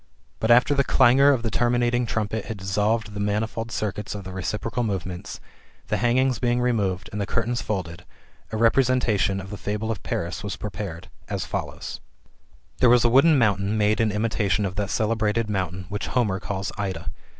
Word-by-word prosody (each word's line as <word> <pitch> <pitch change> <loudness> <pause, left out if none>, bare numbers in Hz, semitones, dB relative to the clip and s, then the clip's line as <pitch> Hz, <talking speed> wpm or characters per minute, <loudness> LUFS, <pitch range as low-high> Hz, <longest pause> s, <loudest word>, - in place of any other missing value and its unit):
But, 110 - -1
after 125 +4 +6
the 140 -1 +3
clangour 135 +2 +5
of 130 -5 +2
the 115 - -1
terminating 120 0 +1
trumpet 110 -1 -2
had 110 -3 -5
dissolved 105 +3 0
the 100 - -5
manifold 110 +2 -2
circuits 105 0 -3
of 100 - -6
the 95 0 -8
reciprocal 105 +5 -3
movements, 95 -5 -4 0.5
the 105 - +1
hangings 125 +3 +2
being 120 0 +1
re 125 0 +2
moved, 95 -5 -1
and 105 - -3
the 100 - -2
curtains 115 +2 -1
folded, 90 -4 -4 0.5
a 110 - -2
representation 115 -4 +2
of 95 +1 -8
[the 105 - -5
fable 105 +3 -3
of] 110 - -4
Paris 85 +3 -3
was 100 - -3
prepared, 100 -5 -6 0.2
as - - -2
follows': - - -5 0.8
There 125 - +5
was 120 0 +5
a - - +5
wooden 140 +5 +6
mountain 105 -3 +2
made 105 +1 +2
in 110 -2 +2
imitation 105 -2 0
of 95 - -3
that 100 -2 -1
celebrated 110 0 0
mountain, 95 -2 -2
which 100 0 -3
Homer 105 -7 0
calls 100 0 -4
Ida. 95 -2 -3
105 Hz, 185 wpm, -24 LUFS, 100-120 Hz, 0.8 s, after